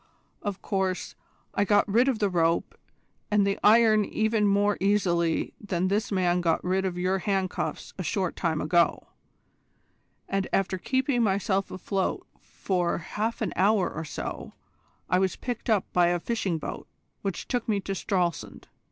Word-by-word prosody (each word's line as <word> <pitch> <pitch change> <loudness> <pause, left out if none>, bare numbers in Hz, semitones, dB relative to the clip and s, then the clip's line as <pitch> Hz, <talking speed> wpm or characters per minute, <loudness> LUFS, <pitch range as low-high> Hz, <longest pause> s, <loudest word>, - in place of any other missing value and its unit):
Of 200 -2 -4
course, 190 -2 -1 0.4
I 200 - +2
got 205 +1 +3
rid 235 +6 +3
of 265 -4 +2
the 210 - +1
rope 165 -1 +1 0.6
and 210 -1 +3
the 200 0 0
iron 215 -1 +6
even 220 0 +1
more 205 +1 +3
easily 175 -4 +1
than 185 -3 -1
this 215 +4 0
man 180 -2 +2
got 165 -2 +1
rid 190 +1 0
of 180 -2 -2
your 185 +2 0
handcuffs 190 -1 -2
a - - -2
short 185 0 -1
time 160 -3 -1
ago, 170 +2 +2 1.2
and 195 -1 -1
after 190 -1 0
keeping 260 +2 0
myself 195 -2 +1
afloat 190 +1 -2
for 180 -3 -2
half 220 +7 -3
an 190 - -2
hour 200 +1 +3
or 160 - -4
so, 155 - -6 0.5
I 180 - +2
was 190 -1 +1
picked 245 -2 -5
up 210 -4 +3
by 175 -1 +4
a 175 0 +1
fishing 200 -4 -1
boat 155 - -6 0.3
which 195 -2 -4
took 245 -3 -2
me 205 -2 +2
to 195 - -4
Stralsund. 180 -3 -2
195 Hz, 160 wpm, -27 LUFS, 180-210 Hz, 1.2 s, iron